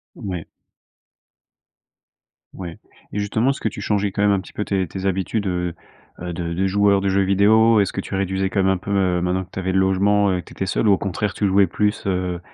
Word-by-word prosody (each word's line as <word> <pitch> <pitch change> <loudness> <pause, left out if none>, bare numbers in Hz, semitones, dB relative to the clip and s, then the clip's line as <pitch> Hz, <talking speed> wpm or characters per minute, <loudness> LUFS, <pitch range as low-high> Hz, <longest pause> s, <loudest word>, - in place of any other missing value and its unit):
Ouais. 90 -5 -5 2.1
Ouais 85 -3 -8 0.3
et - - -3
justement, 110 +5 +1
est-ce 140 - -3
que - - 0
tu 105 - -8
changeais 100 0 0
quand 100 - -1
même 105 0 +4
un 100 - +1
petit 95 - -13
peu 105 - -3
tes 95 -2 0
tes 95 +4 -5
habitudes, 95 +2 -1
heu, 90 -2 -2 0.5
heu, 90 0 -4
de 85 0 -4
de 95 +3 0
joueur 100 0 +3
de 100 - -1
jeux 95 +1 +2
vidéo? 105 +3 +4
Est-ce 100 - 0
que - - -3
tu 100 - -7
réduisais 95 0 0
quand 100 - 0
même 95 0 +3
un - - 0
peu, 95 +2 -8
heu, 95 -3 +1
maintenant 90 +1 -1
que - - -24
tu - - -6
avais 95 0 -1
le 95 - +2
logement 100 +1 +3
et - - -2
que - - -16
tu - - -13
étais 95 - -3
seul 100 +3 +1
ou - - +6
au 95 - +3
contraire, 100 +1 -2
tu 105 - 0
jouais 100 0 +4
plus, 105 +4 -1
heu? 90 -2 -1
95 Hz, 245 wpm, -21 LUFS, 95-100 Hz, 2.1 s, ou